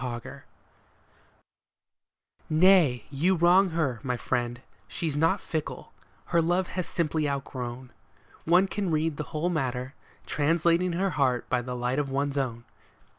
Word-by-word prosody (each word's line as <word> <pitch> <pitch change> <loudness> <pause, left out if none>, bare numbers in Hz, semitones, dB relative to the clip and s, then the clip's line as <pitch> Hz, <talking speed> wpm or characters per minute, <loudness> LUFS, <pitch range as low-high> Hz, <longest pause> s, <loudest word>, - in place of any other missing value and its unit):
OUTGROWN 120 -2 -6 2.1
Nay, 160 -6 +4
you 170 +7 +2
wrong 180 +3 +5
her, 155 -8 -1
my 125 -2 -2
friend, 120 0 -2 0.3
she's 160 -4 -3
not 160 +2 +2
fickle; 155 -2 -5 0.3
her 170 - +2
love 175 +3 +1
she - - -10
has 185 -2 -2
simply 155 -3 -1
outgrown; 130 -3 -5 0.5
One 180 +4 +5
can 195 -1 -2
read 155 -1 0
the 150 - -3
whole 165 +2 -1
matter, 130 -4 -2 0.3
translating 170 +4 +1
her 190 +2 0
heart 130 -5 +1
by 125 - +2
the 125 0 -5
light 125 +3 -1
of 145 -2 -1
one's 140 +1 -1
own. 120 -3 -3
150 Hz, 140 wpm, -27 LUFS, 125-170 Hz, 2.1 s, wrong